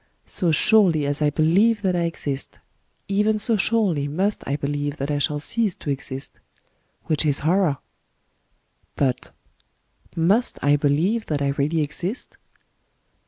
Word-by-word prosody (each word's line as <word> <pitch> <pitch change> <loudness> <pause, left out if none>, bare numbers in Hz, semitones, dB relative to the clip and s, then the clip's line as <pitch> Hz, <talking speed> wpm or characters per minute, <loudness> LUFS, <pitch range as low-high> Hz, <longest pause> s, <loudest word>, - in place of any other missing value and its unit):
So 175 -3 -1
surely 175 -3 +4
as 145 +1 -1
I 150 - +3
believe 195 +9 +2
that 185 -2 +1
I 170 -1 0
exist, 145 -4 -4 0.5
even 210 +2 +1
so 220 +2 +1
surely 195 -9 +1
must 190 +8 -1
I 140 - -1
believe 145 0 -3
that 140 +2 -3
I 145 - -1
shall 145 +1 0
cease 210 +5 0
to 145 - -5
exist 135 0 -6 0.3
— - - -44
which 155 -1 0
is 145 -2 +1
horror!... 165 -1 +1 1.2
But 130 -3 -1 0.5
— - - -35
Must 195 +9 +3
I 145 +1 +4
believe 160 +11 0
that 145 -2 -1
I 140 - +1
really 145 +3 0
exist 180 - -4
155 Hz, 150 wpm, -22 LUFS, 145-195 Hz, 1.2 s, surely